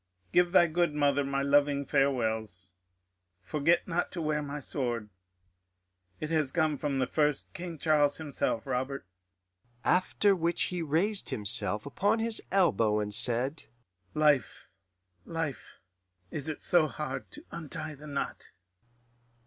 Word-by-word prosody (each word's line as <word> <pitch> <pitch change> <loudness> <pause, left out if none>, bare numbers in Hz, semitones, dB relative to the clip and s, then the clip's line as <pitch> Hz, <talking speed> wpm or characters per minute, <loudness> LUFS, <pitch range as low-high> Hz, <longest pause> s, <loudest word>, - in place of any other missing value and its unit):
Give 175 0 +4
thy 175 -2 +6
good 170 -1 0
mother 145 -1 +2
my 140 0 -1
loving 140 0 +3
farewells.... 110 -10 0 0.7
Forget 155 - +1
not 175 0 -1
to 175 - -4
wear 150 -1 0
my 145 0 -5
sword 120 -6 -2 1.1
it 155 - -4
has 155 -4 +2
come 155 -3 +1
from 145 -2 -1
the 130 - +2
first 150 +1 0
King 170 -2 -6
Charles 145 -2 +3
himself, 145 -7 -2
Robert.' 130 0 -3 0.8
"After 195 +2 +3
which 170 -1 0
he 180 - -2
raised 175 +7 0
himself 105 -2 -1
upon 190 - +1
his 225 0 +1
elbow 115 - +3
and 105 0 -2
said, 125 +5 +2 0.5
'Life 150 -5 +1 0.5
life, 165 -4 -5 0.5
is 150 0 -1
it 155 - -4
so 170 -3 +4
hard 145 -3 -5
to 300 - -12
untie 155 -1 -5
the 150 +1 -12
knot? 140 -1 -4
145 Hz, 135 wpm, -30 LUFS, 130-165 Hz, 1.1 s, thy